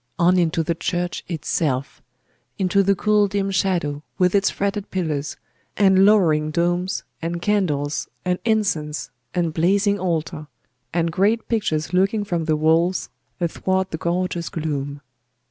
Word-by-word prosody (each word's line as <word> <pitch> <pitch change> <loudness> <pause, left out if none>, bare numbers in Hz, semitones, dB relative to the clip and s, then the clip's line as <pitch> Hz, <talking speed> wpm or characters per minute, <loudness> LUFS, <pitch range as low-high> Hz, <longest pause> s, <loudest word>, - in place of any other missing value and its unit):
On 180 +1 +4
into 165 -1 +1
the 170 - 0
church 175 +1 -2
itself! 145 -5 -2 0.6
Into 195 0 +2
the 195 0 +3
cool 210 +1 +3
dim 195 0 -1
shadow, 175 -6 0 0.2
with 180 -1 +3
its 200 -1 +3
fretted 200 0 -2
pillars, 155 -6 -2 0.4
and 190 -1 +5
lowering 160 -8 +4
domes, 175 +3 0 0.2
and 170 +1 -3
candles, 170 -7 0 0.2
and 180 0 0
incense, 165 - 0 0.2
and 170 -3 0
blazing 200 +5 +2
altar, 160 -4 -2 0.4
and 170 0 0
great 210 +6 +1
pictures 160 - -1
looking 195 +3 +2
from 175 -5 -2
the 155 -1 +2
walls 165 +4 +2 0.3
athwart 185 +2 -1
the 160 - -2
gorgeous 175 0 -1
gloom. 145 -3 -3
175 Hz, 135 wpm, -22 LUFS, 160-195 Hz, 0.6 s, and